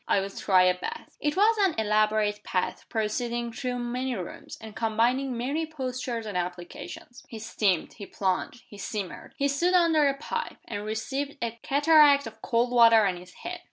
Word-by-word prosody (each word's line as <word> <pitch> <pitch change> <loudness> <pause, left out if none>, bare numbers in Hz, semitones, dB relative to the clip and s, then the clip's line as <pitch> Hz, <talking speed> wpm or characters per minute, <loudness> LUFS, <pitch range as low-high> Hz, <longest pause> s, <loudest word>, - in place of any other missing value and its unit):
"I'll 195 0 +1
try 190 -2 +3
a 185 0 +4
bath." - - -7
It 295 +3 -1
was 435 +3 +5
an 385 -5 +3
elaborate 215 -1 +2
bath, 180 - -2
proceeding 235 +2 -2
through 250 +1 -3
many 250 +1 -2
rooms, 180 -4 -7
and 220 -1 -10
combining 235 +4 +1
many 285 +7 -2
postures 255 -5 -4
and 210 -3 -6
applications. 180 +7 -6
He 225 - -7
steamed. 210 -5 0
He 200 -3 -9
plunged. 210 +7 -2
He 205 - -13
simmered. 200 -3 -6
He 280 - +2
stood 340 +6 +1
under 325 -4 +4
a 275 - -2
pipe, 470 +11 -4
and 205 -2 -5
received 270 +7 -3
a 235 -1 -2
cataract 290 -1 +5
of 220 0 -10
cold 240 +1 +1
water 230 -3 +6
on 190 -2 +1
his 180 +1 -13
head. 355 0 -4
235 Hz, 175 wpm, -27 LUFS, 210-280 Hz, -, water